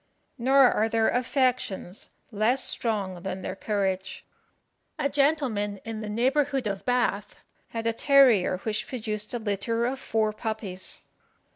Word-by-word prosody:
Nor 265 +1 +5
are 220 +1 +1
their 225 0 +2
affections 250 -7 -1 0.2
less 235 +5 +1
strong 195 -6 -2
than 190 0 -5
their - - -4
courage. 190 -2 -2 0.7
A - - +1
gentleman 275 -9 +1
in 225 -1 -5
the 215 - -5
neighbourhood 265 +4 +1
of 200 -2 -3
Bath 240 -5 0 0.3
had 230 0 -5
a 230 - +1
terrier 245 -8 +5
which 215 -1 -2
produced 215 -4 -3
a 245 - -1
litter 230 +2 -1
of 260 +2 -2
four 220 -4 0
puppies. 215 -4 -4
225 Hz, 135 wpm, -27 LUFS, 205-250 Hz, 0.7 s, Nor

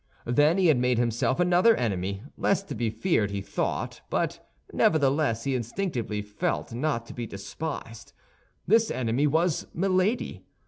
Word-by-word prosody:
Then 145 +8 +3
he 190 - +3
had 155 -7 +5
made 125 -1 +2
himself 120 +3 +1
another 180 +6 +5
enemy, 100 -3 -2
less 195 0 +1
to 195 - -7
be 115 -2 -1
feared, 110 - +1
he 100 0 -3
thought; 95 - -3
but - - -1 0.3
nevertheless, 140 -6 +2
he 135 - -1
instinctively 120 - -2
felt, 105 +2 -3
not 120 -2 -1
to - - -10
be 120 -2 -5
despised. 115 +2 -7 0.5
This 225 +2 +4
enemy 130 +4 +1
was 160 +2 +1
Milady. 190 +5 0
130 Hz, 145 wpm, -27 LUFS, 115-175 Hz, 0.5 s, had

